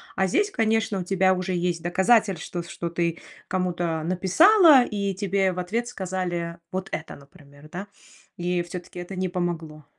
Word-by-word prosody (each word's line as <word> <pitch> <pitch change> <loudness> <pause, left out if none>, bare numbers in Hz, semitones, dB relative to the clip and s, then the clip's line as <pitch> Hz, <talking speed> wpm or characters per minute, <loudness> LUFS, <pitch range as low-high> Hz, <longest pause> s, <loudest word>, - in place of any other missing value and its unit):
А 190 - +2
здесь, 405 - +1
конечно, 225 - 0
у - - -3
тебя 190 0 +2
уже 185 0 -3
есть 175 -1 -1
доказатель 190 +1 +3
что 175 0 -5
что 170 0 -5
ты 170 0 -1 0.3
кому-то 175 -3 -1
написала 275 - +6
и 200 -3 -2
тебе 195 0 0
в 180 - -5
ответ 230 +7 -2
сказали 180 -5 -3
вот 185 +1 -4
это 160 - -5
например, 145 0 -17
да? 190 +3 -5 0.5
И 175 0 -1
всё-таки 175 0 -9
это 175 +2 -7
не 185 0 -1
помогло. 165 -4 -4
180 Hz, 160 wpm, -25 LUFS, 175-195 Hz, 0.5 s, написала